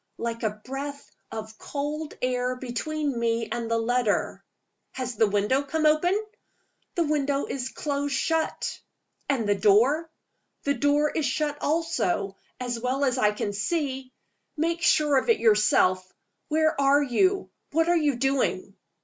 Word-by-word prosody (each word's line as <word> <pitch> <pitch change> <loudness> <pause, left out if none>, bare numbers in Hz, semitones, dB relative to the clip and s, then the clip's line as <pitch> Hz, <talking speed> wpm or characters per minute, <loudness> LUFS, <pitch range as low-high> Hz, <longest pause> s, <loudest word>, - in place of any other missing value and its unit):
"Like 230 0 -3
a 220 - +1 0.2
breath 280 +2 -6 0.2
of 220 0 -7
cold 295 +2 -4
air 250 0 0
between 270 +2 -3
me 230 -1 0
and 235 -1 -3
the 230 - +2
letter." 230 -1 0 0.5
"Has 255 -2 -4
the 220 0 +3
window 205 +7 +1
come 310 +2 -1
open?" 350 +6 +3 0.8
"The 340 - +2
window 285 -2 0
is 260 -1 -4
close 285 0 -2
shut." 320 +5 -1 0.5
"And 245 -6 +1
the 205 - +4
door?" 235 - +3 0.5
"The 280 - +1
door 290 +1 +2
is 310 -3 0
shut 295 +2 -1
also 295 - 0 0.2
as 245 -2 -3
well 260 +4 0
as 255 -1 0
I 210 -3 +4
can 210 -1 -3
see. 265 +2 -2 0.5
Make 335 +2 0
sure 300 -5 +4
of 265 - 0
it 460 - +5
for - - -12
yourself. 185 -4 +3 0.4
Where 315 -1 +1
are 280 +1 +4
you? 370 +10 +1 0.2
What 325 +2 +2
are 350 - +4
you 300 -5 +2
doing?" 270 +2 0
275 Hz, 150 wpm, -26 LUFS, 235-300 Hz, 0.8 s, it